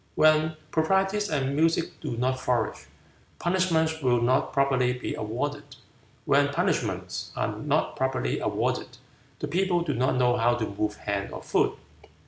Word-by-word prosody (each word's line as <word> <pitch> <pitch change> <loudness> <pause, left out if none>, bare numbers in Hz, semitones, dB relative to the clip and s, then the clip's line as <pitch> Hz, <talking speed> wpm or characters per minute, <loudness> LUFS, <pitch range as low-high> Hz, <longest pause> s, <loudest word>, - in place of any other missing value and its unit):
When 155 0 +4
proprieties 195 +5 +1
and 140 -2 0
music 165 +2 +1
do 135 -7 -4
not 130 +2 0
flourish, 120 -4 -1 0.5
punishments 165 -3 +1
will 125 -3 +3
not 125 +3 +2
properly 130 -2 +2
be 125 - -4
awarded. 145 +6 -4 0.5
When - - +4
punishments - - -2
are - - -1
not - - 0
properly 130 - 0
awarded, - - -2 0.4
the 150 - -4
people 175 +2 +1
do 160 -4 -1
not 130 +1 +1
know 125 -1 +3
how 120 0 +3
to 115 -2 -1
move 105 +1 -2
hand 100 -1 -3
or - - -7
foot. - - +1
135 Hz, 145 wpm, -27 LUFS, 125-160 Hz, 0.5 s, When